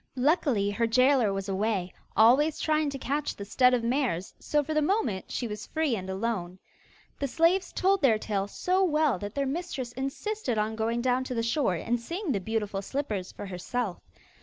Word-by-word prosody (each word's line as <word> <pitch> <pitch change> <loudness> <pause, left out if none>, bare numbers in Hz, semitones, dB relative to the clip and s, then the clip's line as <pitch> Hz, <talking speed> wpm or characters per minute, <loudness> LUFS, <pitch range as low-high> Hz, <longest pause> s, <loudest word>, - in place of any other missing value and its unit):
Luckily 255 - +2
her 230 +3 +1
gaoler 255 -1 +4
was 195 0 -3
away, 195 -2 -1 0.2
always 265 +8 +5
trying 310 -1 +1
to 275 - -5
catch 285 +3 -2
the 200 - -7
stud 250 +4 +4
of 240 - -2
mares, 235 - 0
so 295 -1 +1
for 310 +2 -3
the 305 - +2
moment 295 - 0
she 240 - -2
was 210 -1 -6
free 310 -6 0
and 190 -2 -6
alone. 190 -3 -2 0.6
The 280 - 0
slaves 335 +6 +2
told 385 +1 +2
their 240 -6 +5
tale 200 -2 -2
so 370 - +1
well 305 - +2
that 205 +2 -6
their 280 -1 0
mistress 275 -4 -3
insisted 270 - -3
on 215 +1 0
going 230 +2 -1
down 255 0 +2
to 255 - -4
the 230 - 0
shore 230 - +1
and 235 +9 -1
seeing 340 - -3
the 205 - 0
beautiful 210 -1 -2
slippers 210 -6 -3
for - - -8
herself. 195 +2 -3
245 Hz, 190 wpm, -28 LUFS, 210-295 Hz, 0.6 s, always